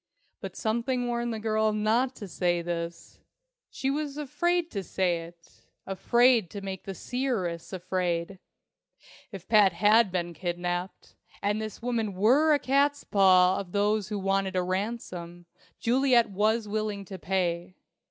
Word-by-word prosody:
But - - -7
something 235 +3 -1
warned 240 0 -1
the 225 - -3
girl 215 0 +1
not 225 +5 +1
to 205 - -8
say 175 -1 0
this. 170 0 -5 0.5
She 270 - -2
was 290 0 -3
afraid 345 +4 0
to 200 - -3
say 180 -2 0
it 170 0 -18 0.2
afraid 230 +2 +3
to 200 - -7
make 190 -1 -6
the 195 - -5
seeress 215 -9 -3
afraid! 180 -1 -2 0.9
If 190 -3 -9
Pat 210 -5 +5
had 210 +1 +4
been 175 -1 -2
kidnapped, 175 +2 -4 0.3
and 210 +2 0
this 215 +1 -7
woman 225 -5 -1
were 260 +11 +4
a 295 - +5
catspaw 210 -10 +3
of 190 -3 -8
those 205 0 +1
who 210 -1 -3
wanted 195 0 0
a 180 - +1
ransom, 185 -3 -4 0.3
Juliet 240 -2 +3
was 215 +3 +1
willing 210 -1 -3
to 190 -1 -8
pay. 175 +1 -2
205 Hz, 145 wpm, -28 LUFS, 180-235 Hz, 0.9 s, Pat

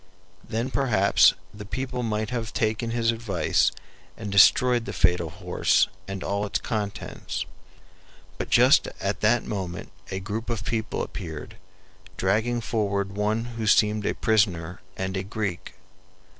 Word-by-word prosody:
Then 115 +4 -3
perhaps 110 -9 +4 0.2
the 105 0 -8
people 125 +5 -4
might 110 -2 -2
have 120 -2 -3
taken 110 +1 0
his 115 0 +1
advice 105 -8 +1 0.5
and 105 -2 -5
destroyed 120 +4 +5
the - - -5
fatal 90 -2 +2
horse 90 +1 +1 0.2
and 95 -1 -5
all 100 +1 -1
its 105 - 0
contents; 105 -3 -4 0.9
but - - -3
just - - +5
at - - -2
that 110 +2 +3
moment 95 -4 -5 0.2
a 95 - -3
group 105 +5 -4
of 115 -2 -3
people 115 -1 -2
appeared, 85 +2 -7 0.6
dragging 110 +5 +1
forward 100 -3 -1
one 105 +3 -1
who 115 -2 -5
seemed 105 0 +4
a - - 0
prisoner 90 -6 +1 0.2
and 95 0 -3
a 95 - -1
Greek. 100 -3 -4
105 Hz, 140 wpm, -25 LUFS, 95-115 Hz, 0.9 s, destroyed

